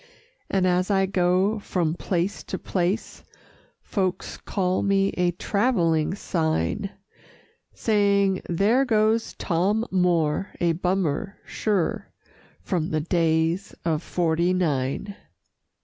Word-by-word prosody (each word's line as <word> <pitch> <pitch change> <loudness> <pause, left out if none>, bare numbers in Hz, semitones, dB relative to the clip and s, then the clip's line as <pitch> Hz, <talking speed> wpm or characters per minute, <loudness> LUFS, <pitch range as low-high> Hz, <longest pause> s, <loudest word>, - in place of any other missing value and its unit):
And 190 -2 +1
as 180 +1 +2
I 195 -1 +3
go 190 +3 +1
from 175 -5 -1
place 180 +2 -2
to - - -4
place, 185 +4 -2 0.6
Folks 185 -3 -2
call 185 -2 -1
me 195 0 +2
a 180 0 +1
"Travelling 175 -4 +1
Sign," 160 - -1 0.9
Saying 200 -3 +2
"There 205 +10 +3
goes 220 -2 +1
Tom 200 +6 0
Moore, 180 -2 +1
a 170 -1 +2
Bummer, 180 +1 -1
sure, 200 -6 -1 0.5
From 170 -4 -1
the 155 -1 0
Days 165 +2 0
of 160 -2 +1
'Forty 170 0 +1
Nine." 160 +2 -1
185 Hz, 105 wpm, -24 LUFS, 170-200 Hz, 0.9 s, I